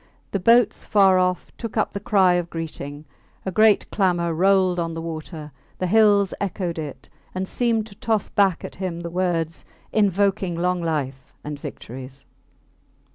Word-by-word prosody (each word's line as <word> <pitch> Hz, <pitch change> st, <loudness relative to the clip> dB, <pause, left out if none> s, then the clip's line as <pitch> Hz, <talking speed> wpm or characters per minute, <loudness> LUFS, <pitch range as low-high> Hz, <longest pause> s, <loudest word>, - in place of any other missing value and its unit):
The 200 Hz, -, -1 dB
boats 230 Hz, +2 st, +4 dB
far 195 Hz, -3 st, +4 dB
off 180 Hz, 0 st, 0 dB
took 230 Hz, -1 st, -5 dB
up 215 Hz, -, +1 dB
the 200 Hz, -, -3 dB
cry 195 Hz, -3 st, +3 dB
of 175 Hz, -1 st, -1 dB
greeting; 155 Hz, -3 st, -6 dB, 0.4 s
a 190 Hz, -, -2 dB
great 215 Hz, +2 st, +4 dB
clamour 175 Hz, -4 st, +1 dB
rolled 185 Hz, +1 st, +3 dB
on 165 Hz, -1 st, -2 dB
the 165 Hz, -, -4 dB
water; 155 Hz, -1 st, -6 dB, 0.3 s
the 185 Hz, -, -2 dB
hills 205 Hz, 0 st, +4 dB
echoed 180 Hz, -3 st, -2 dB
it, 150 Hz, -3 st, -7 dB, 0.3 s
and 190 Hz, 0 st, -2 dB
seemed 230 Hz, -2 st, 0 dB
to 220 Hz, -, -12 dB
toss 220 Hz, 0 st, 0 dB
back 195 Hz, -4 st, +1 dB
at -, -, -8 dB
him 180 Hz, -3 st, -4 dB
the 170 Hz, 0 st, -6 dB
words 170 Hz, -3 st, -1 dB, 0.3 s
invoking 195 Hz, -3 st, +2 dB
long 180 Hz, +1 st, 0 dB
life 140 Hz, -5 st, -3 dB
and 150 Hz, -1 st, -6 dB
victories. 130 Hz, +1 st, -8 dB
180 Hz, 160 wpm, -23 LUFS, 165-200 Hz, 0.4 s, boats